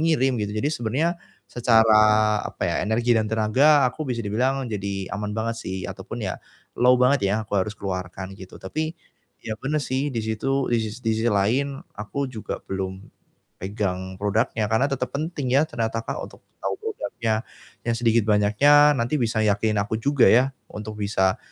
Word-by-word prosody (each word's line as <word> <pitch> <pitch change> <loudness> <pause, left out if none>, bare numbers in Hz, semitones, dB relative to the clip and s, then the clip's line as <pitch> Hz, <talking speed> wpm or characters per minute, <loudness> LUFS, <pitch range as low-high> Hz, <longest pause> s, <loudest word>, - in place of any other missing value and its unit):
ngirim 135 -5 +3
gitu, 105 - -1
jadi 140 - +1
sebenarnya 135 +5 0 0.3
secara 115 -2 +4 0.5
apa - - -8
ya, - - 0
energi 115 +4 +1
dan 110 -1 +1
tenaga 130 +7 +4
aku 130 +3 -2
bisa 120 -3 -2
dibilang 130 +6 0
jadi 100 -4 -4
aman 105 0 -3
banget 115 +1 -1
sih 95 - -5
ataupun - - -6
ya - - -4 0.3
low 125 +1 +4
banget 125 +2 +3
ya, 100 - +1
aku 105 - -19
harus 105 +3 -3
keluarkan 95 0 -5
gitu, 95 -1 -11
tapi 155 - -4 0.5
ya 110 -1 -4
benar 150 +2 -1
sih 130 +1 -1
di 115 - -1
situ 130 +5 -1
di 120 - +3
sis 110 +2 -5
di 110 -1 0
sisi 115 - 0
lain 120 +7 +1 0.2
aku 130 +7 -3
juga 110 -4 -5
belum 95 0 -4 0.6
pegang 95 -2 -3
produknya, 105 +2 0
karena 110 +5 +3
tetap 125 -2 -3
penting 145 -4 -2
ya, 140 - +6
ternyata 115 -7 -2
Kak, - - -4
untuk - - -9 0.2
tahu - - -2
produknya, 115 - -2 0.4
yang 115 - +1
sedikit 115 -2 +2
banyaknya 110 +9 +5
nanti 120 +5 0
bisa 115 -2 0
yakinin 105 0 +1
aku 105 +2 -1
juga 140 -1 +4
ya, 130 +3 +5 0.2
untuk 105 0 -8
bisa, 100 -2 +1
115 Hz, 175 wpm, -24 LUFS, 105-130 Hz, 0.6 s, ya